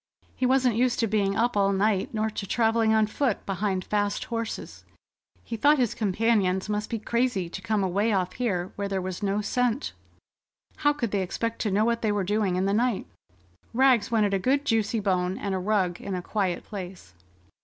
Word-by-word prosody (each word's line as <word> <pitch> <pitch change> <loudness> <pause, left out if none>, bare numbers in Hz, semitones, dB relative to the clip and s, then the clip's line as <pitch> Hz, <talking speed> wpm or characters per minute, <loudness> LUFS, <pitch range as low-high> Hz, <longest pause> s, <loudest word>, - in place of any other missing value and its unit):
He 255 - +1
wasn't 255 -3 +3
used 245 0 +2
to - - +3
being 200 -2 +1
up 240 0 +1
all 200 -1 +3
night, 195 0 +1
nor 220 0 -1
to 200 -2 -5
travelling 225 0 +2
on 220 -1 +4
foot 225 +1 -1
behind 195 -1 -1
fast 205 -1 0
horses. 230 -2 -5 0.6
He 230 - -5
thought 290 +7 +4
his 245 -5 +1
companions 205 -2 +1
must 210 0 -2
be 230 - -2
crazy 235 -4 -1
to 190 - -7
come 205 +1 0
away 200 +4 +1
off 185 -3 0
here 190 -7 -2
where 200 0 -2
there 195 -1 -1
was 185 -1 -5
no 200 +1 0
scent. 250 +4 -1 0.8
How 290 - +3
could 245 -8 -3
they 200 - 0
expect 230 +5 -3
to 210 - -1
know 210 +3 +2
what 235 0 0
they 215 - +1
were 205 -1 0
doing 205 -1 0
in 185 +1 0
the 200 - +1
night? 235 0 +1 0.7
Rags 255 -4 +4
wanted 210 -3 +2
a 195 - +2
good 275 +8 +1
juicy 225 -3 +1
bone, 185 -2 0
and 200 -1 -3
a 190 - -1
rug 185 -2 0
in 195 - -4
a 180 - -4
quiet 190 -4 -1
place. 185 - -8
210 Hz, 200 wpm, -26 LUFS, 195-230 Hz, 0.8 s, on